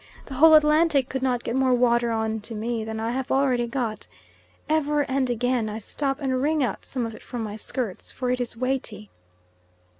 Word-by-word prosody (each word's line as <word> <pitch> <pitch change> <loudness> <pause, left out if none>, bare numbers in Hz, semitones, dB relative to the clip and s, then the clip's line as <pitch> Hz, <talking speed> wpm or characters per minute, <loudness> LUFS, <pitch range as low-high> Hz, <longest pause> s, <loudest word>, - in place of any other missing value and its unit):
The 275 - -9
whole 315 +4 +7
Atlantic 300 -3 +4
could 265 - -3
not 250 -2 0
get 230 - -2
more 260 -1 +3
water 240 -1 +3
on 220 -1 -1
to 220 +2 -7
me 225 +1 -2
than 220 0 -5
I 225 +1 -1
have 260 +1 -3
already 260 -3 +2
got. 230 -4 -3 0.6
Ever 300 -1 +1
and 265 -1 0
again 245 -1 0
I 210 - -4
stop 270 +5 -2
and 260 -3 -1
wring 300 +1 +2
out 230 -6 -3
some 250 -3 -3
of 225 - -5
it - - -12
from 240 -3 -5
my 210 -1 -5
skirts, 220 -2 -4
for 250 -1 -2
it 250 0 0
is 235 -1 -5
weighty. 245 -5 -3
250 Hz, 205 wpm, -25 LUFS, 225-270 Hz, 0.6 s, whole